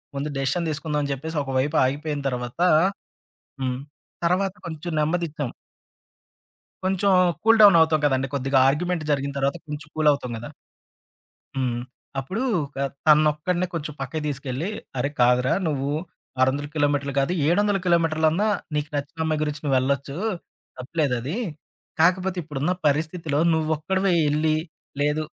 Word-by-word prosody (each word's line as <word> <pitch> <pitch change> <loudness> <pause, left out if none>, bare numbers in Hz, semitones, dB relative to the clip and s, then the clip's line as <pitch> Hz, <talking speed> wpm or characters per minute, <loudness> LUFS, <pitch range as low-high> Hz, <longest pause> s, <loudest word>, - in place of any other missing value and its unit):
ముందు 140 +2 -2
డెసిషన్ 140 +5 0
తీసుకుందాం 150 0 -2
అని 140 - -2
చెప్పేసి 160 +4 -5
ఒక 135 - -5
వైపు 145 +4 0
ఆగిపోయిన 145 +2 -2
తర్వాత, 125 +2 -5 1.0
హ్మ్. 125 -1 -1 0.5
తర్వాత 185 +2 +1
కొంచెం 165 +1 -5
నెమ్మదిచ్చాం. 150 -4 -1 1.4
కొంచెం 190 +1 +2 0.3
కూల్ 225 0 +5
డౌన్ 200 -5 +9
అవుతాం 160 -1 +4
కదండీ! 135 -1 +1
కొద్దిగా 135 0 +1
ఆర్గ్యుమెంట్ 170 +3 -1
జరిగిన 140 -1 0
తర్వాత 140 +2 +1
కొంచెం 150 +1 -6
కూలవుతాం 145 -5 +2
కదా! 120 +6 -8 1.1
హ్మ్. 125 -2 0 0.4
అప్పుడు 190 - -3 0.4
ఆహ్, 140 - -1 0.2
తనొక్కడినే 155 +4 +3
కొంచెం 150 -2 -4
పక్కకి 155 - -3
తీసుకెళ్ళి, 140 +4 -3 0.3
అరే! 125 +3 0
కాదురా 125 +1 +4
నువ్వు 140 -2 -1 0.5
600 140 +3 +2
కిలోమీటర్లు 145 -2 +1
కాదు, 135 +4 +1 0.2
700 205 +4 +3
కిలోమీటర్లన్నా 165 +2 +2 0.3
నీకు 150 0 -1
నచ్చిన 145 +3 -3
అమ్మాయి 155 -1 0
గురించి 150 -1 -3
నువ్వెళ్ళొచ్చు, 140 +1 0 0.6
తప్పులేదది. 135 - -1 0.6
కాకపోతే, 185 +2 +2
ఇప్పుడున్న 150 +3 -1
పరిస్థితిలో 155 0 0
నువ్వొక్కడివే 160 +5 +1 0.2
ఎళ్లి, 155 +1 +2 0.5
లేదు 150 +2 +1
150 Hz, 125 wpm, -24 LUFS, 140-165 Hz, 1.4 s, డౌన్